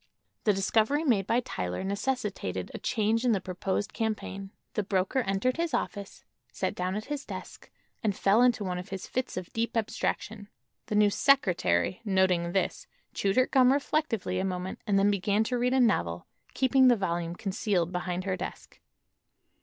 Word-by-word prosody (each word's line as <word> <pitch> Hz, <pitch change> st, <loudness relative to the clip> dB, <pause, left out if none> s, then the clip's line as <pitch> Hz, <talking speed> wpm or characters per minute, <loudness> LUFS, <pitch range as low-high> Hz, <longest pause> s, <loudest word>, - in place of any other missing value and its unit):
The 210 Hz, -, +5 dB
discovery 220 Hz, +9 st, +2 dB
made 215 Hz, -, +2 dB
by 240 Hz, +2 st, +2 dB
Tyler 90 Hz, -, -4 dB
necessitated 200 Hz, -, -2 dB
a -, -, -5 dB
change 225 Hz, +1 st, 0 dB
in 245 Hz, -2 st, +3 dB
the 200 Hz, -, +1 dB
proposed 185 Hz, +2 st, -3 dB
campaign. 210 Hz, -3 st, -3 dB, 0.2 s
The -, -, 0 dB
broker 195 Hz, +5 st, 0 dB
entered 230 Hz, +4 st, 0 dB
his 335 Hz, -1 st, 0 dB
office, 200 Hz, -1 st, -4 dB, 0.3 s
sat -, -, -2 dB
down 185 Hz, +1 st, -2 dB
at 215 Hz, -, -4 dB
his 290 Hz, -1 st, -4 dB
desk -, -, -9 dB, 0.3 s
and 205 Hz, -3 st, 0 dB
fell 200 Hz, +4 st, +4 dB
into 245 Hz, -4 st, +3 dB
one 180 Hz, -2 st, -2 dB
of 180 Hz, +2 st, -8 dB
his 195 Hz, -1 st, -5 dB
fits 255 Hz, -5 st, -3 dB
of 185 Hz, -2 st, -6 dB
deep 230 Hz, +1 st, -1 dB
abstraction. 210 Hz, -1 st, -2 dB, 0.4 s
The 210 Hz, -, -2 dB
new 210 Hz, -1 st, +5 dB
"secretary," 180 Hz, -, +2 dB
noting 190 Hz, -4 st, +2 dB
this, 195 Hz, -, -1 dB, 0.3 s
chewed 195 Hz, -1 st, 0 dB
her 255 Hz, -, +5 dB
gum 255 Hz, -1 st, +4 dB
reflectively 265 Hz, -10 st, 0 dB
a -, -, 0 dB
moment 185 Hz, 0 st, -3 dB
and 200 Hz, -1 st, +3 dB
then 200 Hz, +1 st, +4 dB
began 200 Hz, +2 st, +1 dB
to 245 Hz, +2 st, -1 dB
read 250 Hz, +1 st, +1 dB
a -, -, +4 dB
novel, 240 Hz, -3 st, +1 dB, 0.3 s
keeping 260 Hz, 0 st, +4 dB
the 245 Hz, -, +6 dB
volume 170 Hz, -4 st, -2 dB
concealed 190 Hz, -3 st, -1 dB
behind 180 Hz, 0 st, -2 dB
her 190 Hz, -1 st, -1 dB
desk. 185 Hz, +1 st, -8 dB
200 Hz, 175 wpm, -28 LUFS, 185-235 Hz, 0.4 s, the